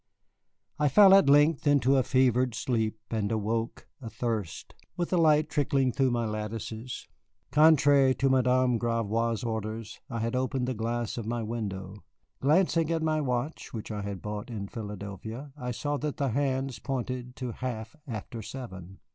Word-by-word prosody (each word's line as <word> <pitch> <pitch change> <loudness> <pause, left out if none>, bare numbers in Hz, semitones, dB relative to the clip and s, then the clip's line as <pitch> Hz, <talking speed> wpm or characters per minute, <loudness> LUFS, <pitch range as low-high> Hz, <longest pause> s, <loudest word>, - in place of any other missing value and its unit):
I 150 - +3
fell 195 +6 +8
at 195 -7 +6
length 145 +1 +4
into 140 -2 +4
a 135 - +5
fevered 125 -1 +2
sleep, 110 -3 -1
and 110 -2 -1
awoke, 115 +1 -2
athirst, 115 -5 -4 0.2
with 175 -1 -2
the 180 - +3
light 155 -2 +4
trickling 135 -3 +1
through 135 0 +2
my 120 -1 0
lattices. 110 +2 -5 0.4
Contrary 145 -3 +5
to 135 - +1
Madame 130 -2 +3
Gravois's 115 0 0
orders, 110 -1 -4
I 115 - -4
had 115 +2 -1
opened 130 0 -1
the 130 - -1
glass 115 +1 -2
of 110 - -6
my 120 0 -2
window. 100 -3 -5 0.4
Glancing 165 +2 +3
at 165 -1 0
my 155 -1 +1
watch, 125 +2 -3
which 110 0 -6
I 105 -1 -3
had 100 -3 -5
bought 105 +2 -5
in 100 -4 -5
Philadelphia, 110 +5 -7
I 125 -4 -5
saw 145 +4 -2
that 150 0 -3
the 140 -2 0
hands 135 -1 -1
pointed 125 0 -4
to 125 -2 -4
half 115 -1 -5
after 115 0 -6
seven. 95 -7 -8
120 Hz, 160 wpm, -28 LUFS, 110-135 Hz, 0.4 s, fell